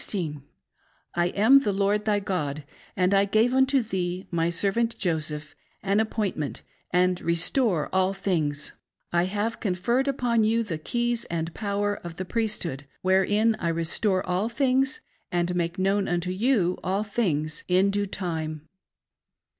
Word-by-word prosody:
I 175 0 +2
am 220 +9 +6
the 240 -7 0
Lord 200 +2 +1
thy 210 -1 +2
God, 155 -7 -2 0.3
and 185 +1 +3
I 200 0 +5
gave 220 +5 +2
unto 265 0 +3
thee, 185 -3 -3
my 170 -1 +1
servant 205 +6 0
Joseph, 155 -4 -2 0.3
an 200 +1 +2
appointment, 210 -9 -2 0.3
and 180 0 +2
restore 170 - +1
all 190 0 +3
things; 155 -7 -1 0.4
I 170 0 +3
have 205 +4 -2
conferred 235 +7 0
upon 245 -4 +1
you 225 +2 +2
the 170 -8 -4
keys 240 +6 -1
and 165 0 -3
power 205 -1 -1
of 170 -1 -8
the 185 - -4
Priesthood, 180 - -2 0.2
wherein 205 +4 +3
I 170 - 0
restore 175 +4 0
all 180 +5 0
tljings, 265 +2 +1 0.3
and 175 0 0
make 170 -1 -1
known 195 +1 +1
unto 175 +1 -1
you 190 -3 +1
all 195 +3 0
things, 160 -8 -1
in 185 +2 +3
due 205 0 -1
time. 160 -5 -4
190 Hz, 145 wpm, -26 LUFS, 175-220 Hz, 0.4 s, am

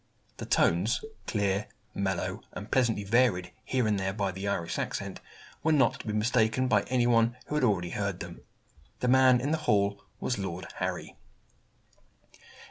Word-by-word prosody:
The - - -6
tones - - +2 0.2
clear, 100 -1 0 0.3
mellow, 95 -2 -2
and - - -8
pleasantly 115 -5 +2
varied 100 -5 +2
here 130 -3 0
and 105 -2 +1
there 95 0 -1
by 100 -2 -1
the 95 +2 -5
Irish 85 -4 -2
accent - - -4 0.4
were 160 - +2
not 135 -6 +3
to - - -9
be 105 - -1
mistaken 110 +3 +2
by 105 -5 +4
any 125 -1 +2
one 115 0 +3
who - - -6
had 150 -2 +1
already 90 -7 +1
hear 100 -1 -1
them. 90 -2 -9 0.6
The 125 - +1
man 130 0 +6
in 140 +4 -1
the 160 - +1
hall 100 -2 +2 0.2
was 125 - -2
Lord 95 -2 -4
Harry. - - -4
105 Hz, 165 wpm, -29 LUFS, 95-125 Hz, 0.6 s, man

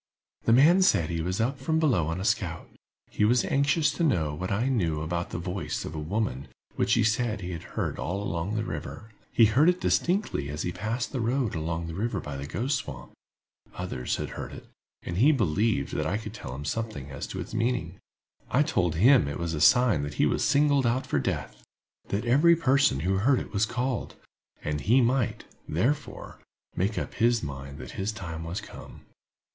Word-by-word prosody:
"The - - +3
man 155 +10 +6
said 85 - +3
he 85 -1 -1
was 90 +4 -2
up 130 +5 0
from 160 +5 0
below 125 - +2
on 80 +2 -2
a 95 - -3
scout. 95 -6 -1 0.4
He - - 0
was 120 +3 +3
anxious 145 +3 +2
to 170 - -2
know 85 - +1
what 90 +5 -4
I 110 +6 +1
knew 85 - 0
about 85 +2 -2
the - - -4
voice 90 -2 -4
of - - -6
a 80 - -4
woman 80 - -2 0.3
which - - +1
he 115 - +3
said 110 -1 0
had 90 -2 -5
been - - -14
heard - - -2
all 90 +9 -2
along 85 +3 -2
the 110 - 0
river. 110 0 -6 0.2
He 115 - +6
heard 130 +10 +4
it 180 0 +1
distinctly 180 - 0
as 75 +1 -4
he 90 - -2
passed 110 +7 -3
the 135 - -3
road 120 0 0
along 80 0 -3
the 85 - -6
river 105 +2 -2
by 75 -4 -6
the 70 +1 -5
Ghost 135 - -1
Swamp; 65 - -9 0.6
others 90 -9 -3
had - - -4
heard - - -7
it, - - -10 0.4
and 85 - -4
he 135 +9 +6
believed 105 - +1
that 75 - -1
I 95 +5 0
could 110 -1 -7
tell 65 - -7
him 70 - -6 0.5
as - - -5
to - - -6
its - - -7
meaning. 115 -7 -1 0.5
I 140 - +3
told 90 - 0
him 120 - +5
it 70 - -3
was 85 -1 -3
a 75 - -3
sign 120 - +5
that 70 0 -5
he - - +3
was - - +1
singled 140 -3 +3
out 125 +3 0
for 70 - 0
death—that 100 - -5
every 150 +8 +5
person 135 - +3
who 95 +3 +1
heard 130 +6 +3
it - - -8
was 105 +1 +2
called, 125 +1 -2 0.5
and 75 -1 -2
he 120 +6 +4
might, 125 0 +1 0.3
therefore, 135 - -2 0.4
make 100 +4 0
up - - -3
his 120 0 +2
mind 70 -1 -6
that - - -8
his 100 +2 -2
time 80 -6 -6
was 85 +5 -4
come. - - -11
105 Hz, 205 wpm, -27 LUFS, 80-125 Hz, 0.6 s, man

